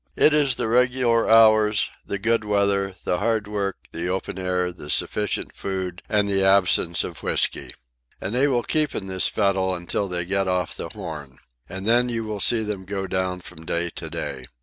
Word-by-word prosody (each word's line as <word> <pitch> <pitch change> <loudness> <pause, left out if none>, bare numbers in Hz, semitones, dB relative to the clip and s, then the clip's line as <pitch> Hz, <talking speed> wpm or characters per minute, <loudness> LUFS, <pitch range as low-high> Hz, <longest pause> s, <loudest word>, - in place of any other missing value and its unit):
"It 155 - +5
is 145 -4 +2
the - - -2
regular 125 0 +2
hours, 110 -2 +5
the 100 - -4
good 115 +3 +1
weather, 100 -2 +1
the 90 - 0
hard 110 -2 0
work, 100 -2 -2
the 85 +1 -4
open 95 0 -3
air, 90 -1 -1
the 75 -4 -11
sufficient 105 +6 -1
food, 95 -2 -4
and 105 -1 +2
the 95 -1 +1
absence 95 -3 +3
of - - -7
whisky. - - 0 0.5
And 100 - -4
they 130 +4 +3
will 125 -4 +1
keep 155 -2 0
in 95 - -3
this 95 -1 +2
fettle 95 -2 +1
until 90 +3 -2
they 90 -2 -2
get 95 +1 0
off 90 -1 -1
the - - -6
Horn. 70 -5 -8 0.3
And 95 0 -6
then 120 +2 +4
you 115 -1 -2
will 105 -1 -4
see 110 +3 +3
them 105 -3 -4
go 95 0 -3
down 95 -1 -2
from 80 -2 -10
day 85 +1 -2
to - - -7
day. 65 -2 -5
100 Hz, 195 wpm, -23 LUFS, 90-110 Hz, 0.5 s, It